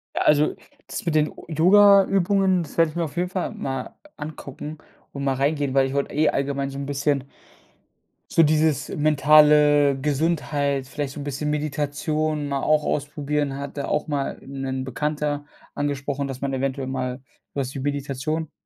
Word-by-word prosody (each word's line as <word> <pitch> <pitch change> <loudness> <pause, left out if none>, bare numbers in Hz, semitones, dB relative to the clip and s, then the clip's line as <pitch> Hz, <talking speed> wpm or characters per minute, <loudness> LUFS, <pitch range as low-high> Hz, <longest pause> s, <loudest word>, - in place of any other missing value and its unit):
Ja, - - 0
also 150 0 +3 0.3
das - - -6
mit 165 - 0
den 155 0 +3 0.2
Yogaübungen, 195 +2 +4
das 155 - -12
werde 165 -1 +4
ich 155 - -12
mir 170 - 0
auf 155 - -6
jeden 180 +1 0
Fall 185 -1 -2
mal 135 -1 -5 0.2
angucken 150 0 -7 0.4
und 140 0 -5
mal 135 - +1
reingehen, 140 0 0
weil 135 -1 +4
ich 135 - -5
wollte 140 0 -1
eh 155 +1 +3
allgemein 140 0 -1
so 135 - -7
'n 140 - -4
bisschen 140 -1 0 1.1
so 165 - +5
dieses 155 -2 +2
mentale 150 -1 +5
Gesundheit, 145 -2 0
vielleicht 145 -2 -4
so 150 - -8
'n 145 - -5
bisschen 145 +1 -3
Meditation 150 +1 -1
mal 140 -1 -1
auch 155 0 +2
ausprobieren. 145 -1 -2
Hatte, 140 0 -5
auch 150 - 0
mal 145 -2 -2
'nen 135 -1 -4
Bekannter 145 +2 -2 0.3
angesprochen, 140 -1 -2
dass 135 -2 -6
man 135 0 -2
eventuell 135 0 -2
mal 130 0 -4 0.3
was 135 -1 -2
wie 135 - -5
Meditation 145 +3 -3
145 Hz, 165 wpm, -23 LUFS, 140-155 Hz, 1.1 s, so